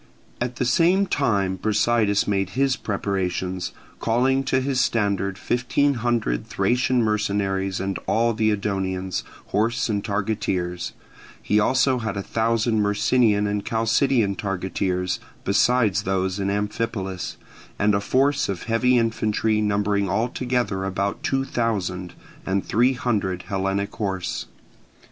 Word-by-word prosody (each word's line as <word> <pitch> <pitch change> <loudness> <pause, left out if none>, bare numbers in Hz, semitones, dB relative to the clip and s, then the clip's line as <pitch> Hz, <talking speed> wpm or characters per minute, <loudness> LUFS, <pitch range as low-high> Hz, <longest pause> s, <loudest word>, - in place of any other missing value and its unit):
At 120 0 -2
the 125 - -1
same 175 +10 +3
time 100 - 0
Brasidas 105 +1 +2
made 95 -2 0
his 135 -1 +3
preparations, 95 -3 -2 0.3
calling 130 +4 +2
to 130 0 +2
his 130 -1 0
standard 100 -5 0
fifteen 125 +6 +1
hundred 115 - -1
Thracian 125 0 +1
mercenaries 100 -3 0
and 95 -1 -2
all 115 +1 +2
the 110 0 +1
Edonians, 95 -3 -1 0.3
horse 115 +3 0
and 100 -2 -1
targeteers; 100 -4 -2 0.5
he 105 - +1
also 130 +3 +3
had 105 -4 -3
a 100 - -2
thousand 115 0 +1
Myrcinian 105 +1 +2
and 105 0 -1
Chalcidian 115 -1 +2
targeteers, 95 -1 -2 0.2
besides 105 -1 +3
those 95 0 -1
in 100 0 0
Amphipolis, 100 -2 -3 0.4
and 105 0 +2
a 100 - +1
force 135 +5 +2
of 95 -3 -3
heavy 125 +2 +2
infantry 110 -1 +1
numbering 100 -1 +1
altogether 120 -1 -1
about 100 +1 -2
two 135 0 0
thousand, 95 -8 -2 0.3
and 95 0 -1
three 120 +5 +3
hundred 100 -7 -1
Hellenic 95 0 -1
horse. 95 -4 -3
105 Hz, 125 wpm, -23 LUFS, 95-120 Hz, 0.5 s, same